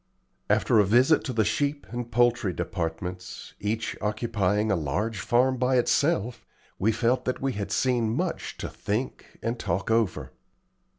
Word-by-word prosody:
After 110 - +3
a - - +6
visit 125 +10 +4
to 130 - -2
the 110 -3 +1
sheep 145 +7 -1
and 120 0 -5
poultry 120 -5 +2
departments, 90 +3 -5
each 110 +2 -2
occupying 105 -1 0
a - - +3
large 95 +8 -2
farm 130 +6 +2
by 125 +1 +2
itself, 120 -3 +1 0.4
we 110 +4 +3
felt 120 +3 +1
that 130 - -1
we 135 -1 -1
had 100 -2 -4
seen 120 -2 +1
much 110 - -2
to - - -4
think 110 +6 -4
and 115 +1 -2
talk 95 +3 -1
over. 110 -4 0
115 Hz, 155 wpm, -26 LUFS, 100-125 Hz, 0.4 s, a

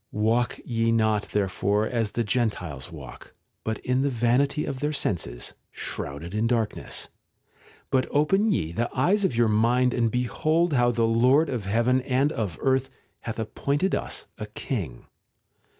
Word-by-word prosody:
■ - - -50
Walk 115 +3 +1
ye 115 -1 +1
not 110 -2 +1
therefore 100 +1 +1
as 115 -3 -1
the 120 - 0
Gentiles 100 - -2
walk, - - -11 0.5
in 125 +1 +1
the 140 - +2
vanity 125 +4 +1
of 130 - -4
their 150 +2 -1
senses, 80 - -2 0.2
shrouded 80 +6 -5
in 110 +2 +1
darkness 115 -3 -2 0.4
'; - - -28
but 130 -1 +2
open 195 +9 +3
ye 80 - 0
the 120 +7 -1
eyes 190 +10 +3
of 165 -11 +1
your 120 0 +4
mind 120 +4 +3
and 115 -2 +2
behold 155 +8 +1
how 120 -2 +4
the 115 -1 +2
Lord 125 +7 +4
of 120 -7 -3
heaven 120 +6 +2
and 135 +3 +1
of 105 - -3
earth 135 0 +2 0.3
hath 115 - -5
appointed 140 - -1
us - - -3
a 105 - -4
king. 100 - -5
120 Hz, 160 wpm, -26 LUFS, 105-135 Hz, 0.5 s, your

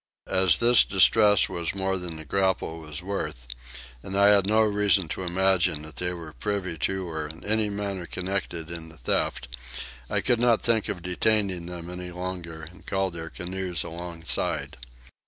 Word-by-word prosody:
As 95 -4 +5
this 120 0 +6
distress 105 +1 +5
was 85 -1 -3
more 95 0 0
than 90 -2 -4
the 80 0 -8
grapnel 95 0 0
was 75 +1 -7
worth, 75 -10 -4 0.6
and 95 +6 -5
I 100 0 +6
had 100 -2 +5
no 110 +1 +4
reason 105 -4 +2
to - - -4
imagine 90 -3 +2
that 80 0 -10
they 90 0 0
were 85 -3 -8
privy 100 -5 -2
to 95 +4 -1
or 80 -2 -3
in 80 +3 -11
any 110 0 +1
manner 100 -3 -3
concerned 90 -3 -3
in 85 -1 -7
the 80 - -14
theft, - - 0 0.6
I - - +1
could 120 - +2
not 120 -2 +3
think 115 -2 +2
of 90 -5 -4
detaining 95 -1 +1
them 90 -1 -6 0.3
longer 90 -3 -5
and 90 +4 -12
called 95 -2 -1
their 80 -1 -6
canoes 90 -2 -3
alongside. 85 0 -3
90 Hz, 170 wpm, -26 LUFS, 85-100 Hz, 0.6 s, this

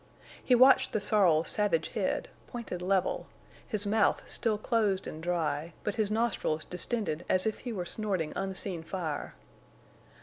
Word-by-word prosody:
He 250 - +4
watched 260 +2 +6
the - - +1
sorrel's 180 -7 +3
savage 200 -7 +2
head, - - -1 0.2
pointed 230 -8 -6
level, 185 +1 0 0.4
his 215 -3 -2
mouth 210 +1 +2
still 220 -2 0
closed 210 -4 0
and 155 - -7
dry, 165 -2 -1
but 210 - -1
his 215 -1 0
nostrils 215 -8 0
distended 180 -3 -1
as 185 - +3
if 220 - -1
he 245 - -5
were 185 -5 -3
snorting 190 -5 -1
unseen 190 -2 -2
fire. 160 -3 -4
195 Hz, 145 wpm, -30 LUFS, 170-215 Hz, 0.4 s, watched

